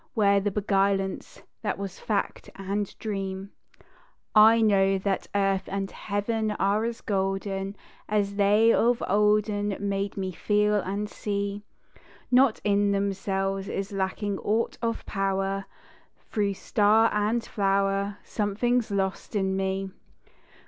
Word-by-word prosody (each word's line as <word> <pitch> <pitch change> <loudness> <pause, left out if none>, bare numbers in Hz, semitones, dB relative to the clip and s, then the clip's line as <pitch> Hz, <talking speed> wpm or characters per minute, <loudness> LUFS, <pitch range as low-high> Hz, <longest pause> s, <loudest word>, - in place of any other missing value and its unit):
Where 200 -3 +4
the 200 +1 0
beguilance 195 -1 -1 0.2
that 210 -3 -2
was 195 -2 -6
fact 205 -2 -2
and 195 +1 -3
dream? 195 -2 -4 0.8
I 220 +2 +7
know 195 -3 +3
that 195 0 -2
Earth 195 -1 +1
and 195 0 -3
Heaven 215 +2 -2
are 205 +2 +1
as 230 0 -4
golden 195 0 -2 0.3
As 205 -1 +1
they 210 +3 +4
of 240 +1 +2
olden 210 0 +2
made 200 0 -2
me 190 -1 -2
feel 210 +3 +1
and 200 +2 -3
see; 200 -1 -3 0.7
Not 250 -2 +4
in 205 0 +2
themselves 195 0 -1
is 195 0 -3
lacking 195 +1 -2
aught 220 +3 0
of 230 -1 -2
power 195 0 -1 0.7
Through 200 -2 0
star 215 +3 +3
and 215 +3 +1
flower 195 0 0
something's 225 +3 0
lost 195 +1 -2
in 190 -1 +1
me. 190 0 -2
200 Hz, 120 wpm, -26 LUFS, 195-210 Hz, 0.8 s, I